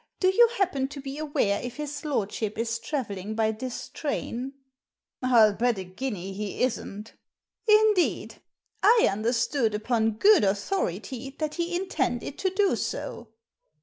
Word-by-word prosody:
Do 370 Hz, -, +4 dB
you 470 Hz, +5 st, +6 dB
happen 285 Hz, -9 st, +1 dB
to 280 Hz, +1 st, -9 dB
be 275 Hz, +1 st, -6 dB
aware 285 Hz, -10 st, 0 dB
if 245 Hz, -1 st, -6 dB
his 295 Hz, -1 st, -5 dB
lordship 220 Hz, -6 st, -2 dB
is 230 Hz, 0 st, -1 dB
travelling 220 Hz, -5 st, -4 dB
by 220 Hz, -1 st, +2 dB
this 245 Hz, +3 st, -6 dB
train?" 270 Hz, -3 st, -4 dB, 0.4 s
« -, -, -66 dB
ril 235 Hz, -5 st, +5 dB
bet 235 Hz, +1 st, +1 dB
a 190 Hz, -, -4 dB
guinea 195 Hz, -1 st, -5 dB
he 205 Hz, +3 st, -3 dB
isn't" 225 Hz, -3 st, -3 dB, 0.3 s
" -, -, -47 dB
Indeed! 425 Hz, -4 st, +3 dB, 0.4 s
I 445 Hz, +4 st, +6 dB
understood, 230 Hz, +2 st, 0 dB
upon 220 Hz, 0 st, +1 dB
good 400 Hz, -, +5 dB
authority, 220 Hz, -, -2 dB
that 305 Hz, -1 st, -2 dB
he 345 Hz, 0 st, -2 dB
intended 295 Hz, -7 st, -2 dB
to 380 Hz, -, +1 dB
do 390 Hz, +1 st, +2 dB
so." 235 Hz, -, -4 dB
250 Hz, 150 wpm, -27 LUFS, 215-310 Hz, 0.4 s, you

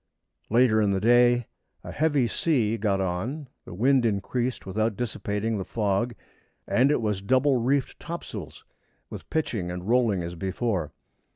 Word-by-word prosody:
Later 115 Hz, -1 st, +4 dB
in 105 Hz, -, +2 dB
the 95 Hz, -1 st, +1 dB
day 120 Hz, +2 st, +4 dB, 0.4 s
a -, -, -7 dB
heavy 145 Hz, -4 st, +2 dB
sea 120 Hz, -4 st, +1 dB
got 100 Hz, -3 st, 0 dB
on; 95 Hz, -, -3 dB, 0.2 s
the -, -, -9 dB
wind 130 Hz, +5 st, +3 dB
increased 120 Hz, +4 st, -1 dB
without 110 Hz, +2 st, -1 dB
dissipating 110 Hz, -2 st, -2 dB
the -, -, -2 dB
fog, 105 Hz, +3 st, -1 dB, 0.5 s
and 130 Hz, +3 st, +3 dB
it 150 Hz, -, +2 dB
was 105 Hz, -3 st, -1 dB
double 130 Hz, +5 st, +3 dB
reefed 130 Hz, +3 st, 0 dB
topsails 110 Hz, -, -7 dB, 0.5 s
and -, -, -9 dB
pitching 110 Hz, -, -2 dB
and 90 Hz, +1 st, -6 dB
rolling 115 Hz, -6 st, +2 dB
as 85 Hz, +1 st, -5 dB
before. 95 Hz, -1 st, -2 dB
115 Hz, 150 wpm, -26 LUFS, 100-125 Hz, 0.5 s, Later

